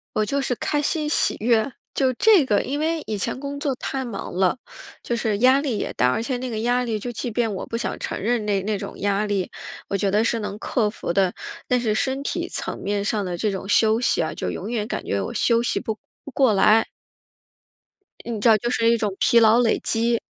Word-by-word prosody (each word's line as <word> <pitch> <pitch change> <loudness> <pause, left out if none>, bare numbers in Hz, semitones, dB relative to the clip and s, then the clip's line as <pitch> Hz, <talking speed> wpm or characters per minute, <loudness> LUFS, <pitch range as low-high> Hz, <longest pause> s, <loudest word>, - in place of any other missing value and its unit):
我 215 - +2
就 280 +5 -1
是 250 - 0
开 295 +4 -1
心、 300 0 0
喜 300 - +1
悦， 230 +3 +2 0.2
就 265 -2 +2
这 390 - +5
个， 210 -4 +2
因 285 +2 -3
为 320 0 0
以 215 - -3
前 230 - -3
工 280 0 -5
作 285 -2 -1
太 265 +1 -4
忙 230 -7 -6
了， 185 +6 +2 0.4
就 240 - -2
是 220 -3 -1
压 260 +4 +5
力 260 -7 -2
也 - - -3
大， 125 +1 +2
而 220 - -1
且 250 +2 -2
那 255 0 -4
个 220 -2 -3
压 245 +2 +1
力 225 -3 -2
就 245 - -5
即 235 +1 -3
便 225 -1 0
我 185 - -5
不 230 - -4
想 - - -3
承 - - -4
认 225 0 0
那 200 -2 +1
那 210 0 -1
种 - - -8
压 200 +1 0
力， 200 -3 -1 0.4
我 200 - -2
觉 195 0 0
得 210 +2 +3
是 230 0 +1
能 210 0 -5
克 220 -4 0
服 205 -5 -4
的。 190 -1 +2 0.3
但 250 -1 +1
是 215 -3 0
身 265 +4 -1
体 - - -3
层 - - -2
面 200 0 -2
上 210 -2 0
的 175 -2 -4
这 210 - 0
种 195 0 -5
休 220 +2 +3
息 - - +2
啊， - - -2
就 - - -3
永 - - -5
远 220 -3 -1
感 - - -4
觉 100 0 -1
我 - - -4
休 235 0 +2
息 - - 0
不 220 -1 -4 0.3
不 285 - -8
过 260 -3 +3
来。 215 +3 +4 1.4
你 230 -3 -4
知 220 - +2
道 220 - +6
就 240 +3 -3
是 230 -2 +2
一 235 - +3
种 210 -4 -2
疲 235 - +5
劳 225 +1 +5
累 235 -2 +2
积。 230 0 +1
225 Hz, 260 characters per minute, -23 LUFS, 210-250 Hz, 1.4 s, 道